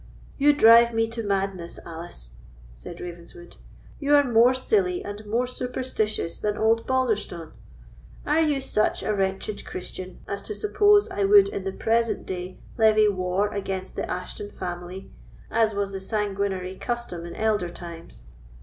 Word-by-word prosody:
"You 290 Hz, +1 st, +6 dB
drive 235 Hz, -3 st, +7 dB
me 225 Hz, 0 st, +2 dB
to 230 Hz, 0 st, -4 dB
madness, 195 Hz, -4 st, -2 dB
Alice," 165 Hz, -, -8 dB, 0.4 s
said -, -, -10 dB
Ravenswood; 175 Hz, 0 st, -10 dB, 0.4 s
"you 290 Hz, 0 st, +3 dB
are 285 Hz, -, +6 dB
more 245 Hz, 0 st, +4 dB
silly 365 Hz, -, +1 dB
and 205 Hz, +1 st, -6 dB
more 235 Hz, +4 st, +1 dB
superstitious 250 Hz, -7 st, -2 dB
than 210 Hz, 0 st, -1 dB
old 225 Hz, +1 st, +2 dB
Balderstone. 215 Hz, -10 st, -1 dB, 0.7 s
Are 305 Hz, +2 st, +3 dB
you 295 Hz, -4 st, +1 dB
such 215 Hz, -4 st, 0 dB
a 215 Hz, -, 0 dB
wretched 195 Hz, +1 st, -2 dB
Christian 185 Hz, 0 st, -7 dB
as 200 Hz, -, -4 dB
to 425 Hz, -, -6 dB
suppose 415 Hz, 0 st, +4 dB
I 205 Hz, -, -1 dB
would 200 Hz, 0 st, +7 dB
in 195 Hz, -, -5 dB
the 195 Hz, -, -1 dB
present 230 Hz, +3 st, 0 dB
day 185 Hz, 0 st, -5 dB, 0.2 s
levy 215 Hz, -1 st, +5 dB
war 185 Hz, +1 st, 0 dB
against 190 Hz, -2 st, -4 dB
the -, -, -3 dB
Ashton 180 Hz, +3 st, -5 dB
family, 180 Hz, +1 st, -7 dB, 0.4 s
as 220 Hz, -2 st, +2 dB
was 200 Hz, -1 st, -1 dB
the 195 Hz, -1 st, -5 dB
sanguinary 195 Hz, -2 st, -2 dB
custom 240 Hz, -8 st, -4 dB
in 170 Hz, -, -8 dB
elder 215 Hz, -5 st, 0 dB
times? 165 Hz, -, -10 dB
205 Hz, 150 wpm, -25 LUFS, 185-235 Hz, 0.7 s, drive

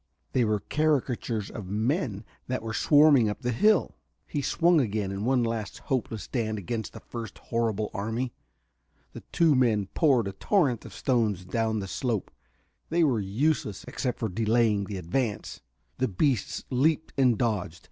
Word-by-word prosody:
They 125 Hz, -, +3 dB
were 105 Hz, -2 st, +1 dB
caricatures 130 Hz, -8 st, 0 dB
of 105 Hz, -5 st, -7 dB
men 110 Hz, -, -1 dB, 0.2 s
that 130 Hz, -2 st, -2 dB
were 110 Hz, 0 st, -4 dB
swarming 145 Hz, -4 st, +5 dB
up 105 Hz, +6 st, -5 dB
the 125 Hz, -, 0 dB
hill.... 210 Hz, -, +3 dB, 0.3 s
He 145 Hz, -, -3 dB
swung 170 Hz, +2 st, +3 dB
again 105 Hz, -4 st, -1 dB
in 100 Hz, +2 st, -3 dB
one 125 Hz, -1 st, +3 dB
last 115 Hz, -2 st, -3 dB
hopeless 115 Hz, -5 st, -3 dB
stand 110 Hz, -4 st, -2 dB
against 110 Hz, +3 st, -4 dB
the -, -, -8 dB
first 115 Hz, -2 st, -8 dB
horrible 110 Hz, -3 st, -1 dB
enemy. 115 Hz, +5 st, -2 dB, 0.8 s
The -, -, -8 dB
two 165 Hz, -3 st, +4 dB
men 110 Hz, -7 st, +2 dB
poured 130 Hz, -9 st, +3 dB
a -, -, -3 dB
torrent 130 Hz, -, +1 dB
of -, -, -10 dB
stones 110 Hz, -8 st, 0 dB
down 110 Hz, +2 st, -1 dB
the 95 Hz, -, -5 dB
slope; 115 Hz, 0 st, -2 dB, 0.6 s
they 170 Hz, +1 st, +3 dB
were 130 Hz, -8 st, +2 dB
useless, 105 Hz, +1 st, -1 dB
except 125 Hz, -3 st, -2 dB
for 115 Hz, -, -1 dB
their 110 Hz, +3 st, -3 dB
delaying 110 Hz, -2 st, +2 dB
the 100 Hz, 0 st, -5 dB
advance. 105 Hz, +6 st, -2 dB, 0.4 s
The 130 Hz, -, +2 dB
beasts 115 Hz, -, 0 dB
leaped 155 Hz, +5 st, +1 dB
and 125 Hz, -4 st, +3 dB
dodged. 100 Hz, -8 st, -1 dB
115 Hz, 165 wpm, -27 LUFS, 105-130 Hz, 0.8 s, swarming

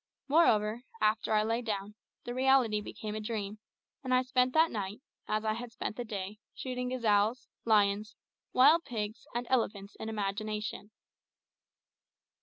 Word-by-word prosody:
Moreover, 230 Hz, -8 st, +3 dB, 0.2 s
after 215 Hz, +1 st, +1 dB
I 215 Hz, -1 st, +4 dB
lay 230 Hz, +2 st, 0 dB
down, 210 Hz, -3 st, -3 dB, 0.3 s
the 240 Hz, -, -5 dB
reality 255 Hz, -4 st, +3 dB
became 210 Hz, 0 st, -6 dB
a 215 Hz, -, -3 dB
dream, 210 Hz, -1 st, -4 dB, 0.4 s
and 255 Hz, -1 st, +2 dB
I 255 Hz, -, +4 dB
spent 255 Hz, 0 st, +2 dB
that 320 Hz, +1 st, +5 dB
night, 205 Hz, -1 st, -4 dB, 0.3 s
as 215 Hz, +1 st, -1 dB
I 215 Hz, -, +2 dB
had 235 Hz, +1 st, -6 dB
spent 220 Hz, -, -4 dB
the 245 Hz, -, -3 dB
day, 210 Hz, -2 st, -5 dB, 0.2 s
shooting 250 Hz, -1 st, -3 dB
gazelles, 225 Hz, -1 st, +2 dB, 0.2 s
lions, 210 Hz, -1 st, +2 dB, 0.4 s
wild 300 Hz, +7 st, +6 dB
pigs, 215 Hz, -4 st, -5 dB
and 240 Hz, +1 st, -1 dB
elephants 205 Hz, -5 st, -1 dB
in 220 Hz, -, -4 dB
imagination. 210 Hz, 0 st, -3 dB
220 Hz, 145 wpm, -31 LUFS, 210-250 Hz, 0.4 s, wild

